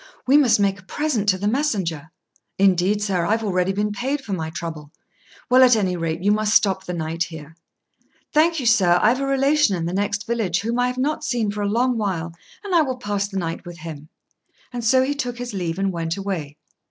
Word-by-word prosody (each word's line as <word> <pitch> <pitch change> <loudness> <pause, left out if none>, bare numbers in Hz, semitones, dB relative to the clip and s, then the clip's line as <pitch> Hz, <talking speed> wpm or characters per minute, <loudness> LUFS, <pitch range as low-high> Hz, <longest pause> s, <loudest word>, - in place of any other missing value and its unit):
"We 265 - +4
must 265 -8 +5
make 195 -1 +1
a - - -16
present 235 -2 -1
to 185 - +3
the 200 +2 -2
messenger." 195 - -1 0.5
"Indeed, 195 +2 +2
sir, 190 -4 0
I've 220 +5 0
already 185 -2 0
been 205 +2 -1
paid 260 +7 -2
for 220 -7 -6
my 160 -3 -3
trouble." 160 -3 -7 0.6
"Well, 255 +1 +5
at 250 -2 +7
any 190 -4 0
rate, 165 0 -3
you 205 - +3
must 215 +1 +1
stop 190 -2 +3
the 180 - -4
night 165 0 -2
here." 160 -1 -11 0.8
"Thank 325 +1 +3
you, 260 - -4
sir: 195 -7 +4
I've 240 +7 +3
a 275 - -1
relation 275 -4 +2
in 165 -2 -3
the 170 - -3
next 200 +1 -1
village 210 -6 -1
whom 230 +3 -2
I 245 - +3
have 250 0 -4
not 290 +4 -1
seen 225 -4 -1
for 210 0 -4
a 205 - 0
long 240 +2 +1
while, 170 -5 -2 0.3
and 400 -2 -4
I 340 - +6
will 260 -4 -2
pass 205 -4 -2
the 195 -1 -6
night 165 -3 -3
with 175 -2 -10
him;" 155 -2 -9 0.6
and 240 -1 -4
so 260 +3 +4
he 275 +2 0
took 245 -4 -4
his 245 -2 -6
leave, 175 -3 -3
and 195 0 0
went 165 0 -3
away. 170 -7 -4
205 Hz, 225 wpm, -22 LUFS, 175-245 Hz, 0.8 s, at